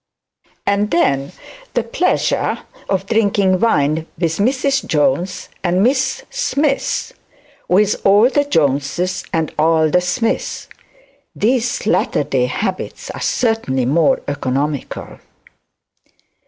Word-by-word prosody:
And 200 +1 +1
then 140 -5 +1 0.4
the - - +2
pleasure - - 0 0.3
of 190 -1 0
drinking 200 -3 +2
wine 155 -6 +1
with 165 -1 -1
Mrs 270 +5 +1
Jones 150 +4 0 0.2
and 180 +1 +2
Miss 260 +3 +1
Smith; 290 - -1 0.6
with 200 +3 +2
all 205 +4 +6
the 285 +2 +2
Joneses 155 - 0
and 160 -2 -1
all 160 0 +3
the 180 - +3
Smiths! 225 +6 -2 0.7
These 245 +1 0
latter 210 -8 +1
day 130 -3 0
habits 185 +8 -4
are - - -8
certainly 225 - 0
more 150 +4 +2
economical. 145 +1 -3
180 Hz, 105 wpm, -18 LUFS, 150-225 Hz, 0.7 s, all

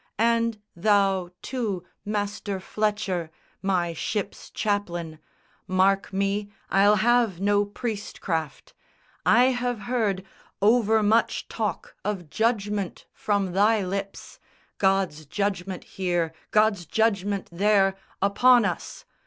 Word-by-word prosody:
And 230 -1 +2 0.2
thou, 195 -1 +2
too, 220 -9 -3 0.2
master 205 -1 -3
Fletcher, 195 -4 -1 0.3
my 180 -3 0
ship's 205 +5 -4
chaplain, 175 -6 -2 0.5
Mark 190 +2 +2
me, 200 +1 -1 0.2
I'll 205 +2 +5
have 230 -3 +2
no 205 +1 +2
priest 210 0 -5
craft. 160 -5 -3 0.5
I 250 +3 +6
have 245 -3 -2
heard 200 -4 -1 0.3
Overmuch 220 0 +3
talk 215 -6 -3
of 190 -6 -4
judgment 210 -4 -1
from 200 -3 0
thy 205 +2 +3
lips, 195 +1 -5 0.4
God's 190 -6 +1
judgment 195 0 -2
here, 175 -4 -1 0.2
God's 210 -5 +2
judgment 205 -2 0
there, 195 +1 +3 0.3
upon 240 +4 +5
us! - - -4
200 Hz, 105 wpm, -25 LUFS, 190-215 Hz, 0.5 s, I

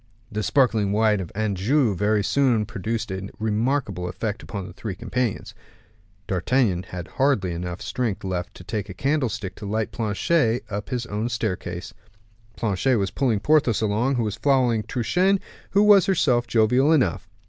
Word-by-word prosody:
The 105 - -2
sparkling 110 -5 +2
wine 105 0 +3
of 90 -4 -6
Anjou 110 +4 +1
very 105 +2 +1
soon 120 -3 +2
produced 110 0 -3
a 95 +1 -5
remarkable 110 -4 -1
effect 105 +4 -4
upon 100 -3 -6
the 90 - -10
three 100 0 -5
companions. 120 +3 -2 0.7
D'Artagnan 95 0 +1
had 90 -1 -6
hardly 130 -9 +1 0.3
strength 115 0 -3
enough 95 - -3
left 90 -1 -4
to - - -11
take 100 +3 -4
a 95 - -7
candlestick 115 - -1
to 105 - -7
light 110 +1 -1
Planchet 115 +3 +1
up 105 +1 -4
his 125 -2 -2
own 110 +1 -2
staircase. 90 -6 -3 0.6
Planchet 115 +4 +1
was 100 -2 -1
pulling 120 -7 0
Porthos 145 -6 +3
along, 110 +5 +1
who 120 - 0
was 105 -1 -3
following 125 -3 +2
Truchen, 180 - +1 0.3
who 200 +2 +4
was 205 -3 +6
herself 130 -10 +2
jovial 120 +6 +3
enough. 150 -6 +1
110 Hz, 160 wpm, -24 LUFS, 100-125 Hz, 0.7 s, was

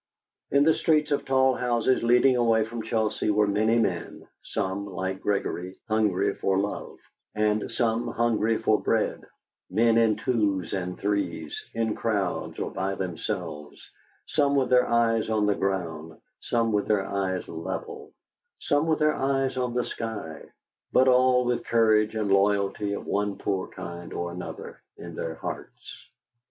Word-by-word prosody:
In 140 +1 +4
the 160 +1 +5
streets 155 -2 +1
of 145 - 0
tall 130 0 +3
houses 125 0 +1
leading 125 +2 +4
away 115 -2 +3
from 115 +1 -6
Chelsea 110 -1 -1
were 105 0 +3
many 110 +3 +2
men, 115 - -2
some, 95 +2 -3
like 95 0 -4
Gregory, 95 -2 -2
hungry 110 -4 +1
for 95 -1 0
love, 100 +1 -3 0.4
and 105 0 0
some 115 -1 0
hungry 115 -1 +1
for - - +2
bread - - 0 0.5
men 115 0 +3
in 110 -2 +3
twos 105 -6 0
and 90 -2 -3
threes, 100 -6 -2
in 115 -1 0
crowds, 105 -5 -2
or - - -3
by 95 +1 -2
themselves, 80 -4 -5 0.3
some 140 -2 +1
with 130 -2 +1
their 125 0 +5
eyes 115 -2 +2
on 110 -1 +2
the 105 - +3
ground, 80 -5 -3 0.2
some 115 -1 0
with 105 -1 0
their 100 -3 +2
eyes 95 -2 -2
level, 80 0 -6 0.5
some 145 +2 +1
with 160 -1 +2
their 155 0 +3
eyes 135 -1 0
on 125 -1 -2
the 125 - +1
sky, 105 -9 -5 0.5
but 130 - +4
all 125 0 +4
with 120 0 0
courage 110 -2 +3
and 105 -2 -1
loyalty 100 +1 +2
of - - -5
one 100 0 -1
poor 95 -2 -2
kind 85 -1 -8
or 85 0 -3
another 90 +1 -8 0.2
in - - -9
their 80 -1 -4
hearts. - - -8
110 Hz, 155 wpm, -26 LUFS, 95-120 Hz, 0.5 s, the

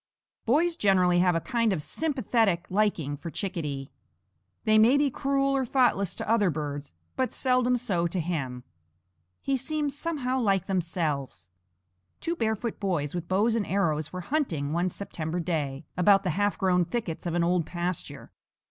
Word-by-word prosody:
Boys 330 +8 +3
generally 185 -3 +3
have 180 -1 +3
a - - +2
kind 230 +5 0
of 185 - 0
sympathetic 230 - 0
liking 185 -8 +1
for 160 +4 -7
Chickadee. 150 -7 -4 0.7
They 215 0 +5
may 235 +6 +6
be 285 -1 +2
cruel 275 +1 +1
or 270 - +1
thoughtless 235 -8 +2
to - - -5
other 210 -3 +3
birds, 145 -2 -4 0.2
but 260 -1 0
seldom 250 -1 +2
so 190 -8 0
to 180 +2 -3
him. 140 -7 -3 0.8
He 275 - +1
seems 290 +2 -2
somehow 280 -5 -1
like 195 -6 +2
themselves. 160 - -2 0.7
Two 335 - -2
barefoot 220 -4 -2
boys 170 -8 -1
with 175 -1 -4
bows 205 +5 +2
and 220 -3 -1
arrows 160 -6 0
were 180 - -5
hunting, 175 - -1
one 175 +2 +1
September 170 -3 -4
day, 150 -6 -2
about 195 +3 +5
the 180 - 0
half 205 +4 0
grown 180 -2 +3
thickets 175 -3 -4
of 170 - -2
an 175 - +2
old 170 -2 +1
pasture. 175 -5 -4
185 Hz, 160 wpm, -27 LUFS, 165-240 Hz, 0.8 s, may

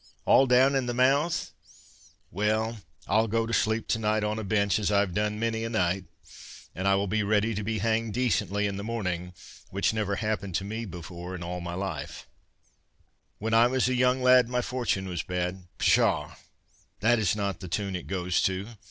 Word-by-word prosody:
—all 135 - +5
down 130 +2 +5
in 135 -2 0
the 120 - -2
mouth—well—I'll 110 - -1
go 115 +1 0
to 115 - -4
sleep 110 +1 +1
to 110 - +1
night 110 0 +1
on 105 +1 -1
a - - -4
bench, 100 -1 +1
as 105 -1 0
I've 100 -3 +2
done 105 +1 -1
many 115 0 -1
a 115 - -2
night, 95 -4 0 0.7
and 95 +4 -2
I 100 - +4
will 100 +1 +1
be 110 +2 0
ready 105 +2 +1
to 105 0 -3
be 110 +2 -2
hanged 110 0 0
decently 105 -4 0
in 100 -1 -2
the 100 - -5
morning, 90 -6 -3 0.4
which 100 +3 0
never 105 -2 -1
happened 100 -4 -2
to 95 - 0
me 110 +3 -4
before 90 0 -7
in 90 - -6
all 90 +1 -4
my 85 0 -5
life— 95 +1 -5 1.1
When 110 +2 -3
I 115 +1 +6
was 130 0 +1
a 130 - +1
young 125 +1 +2
lad, 125 -1 +6
My 125 0 0
fortune 120 -7 -1
was 90 -3 -3
bad—' 90 0 -4
Pshaw! - - +2 0.7
This 115 +2 +4
is 105 -3 +1
not 100 -4 -2
the 90 - -7
tune 95 +2 -2
it 90 - -6
goes 90 -2 0
to." 95 +3 -1
105 Hz, 190 wpm, -27 LUFS, 95-115 Hz, 1.1 s, I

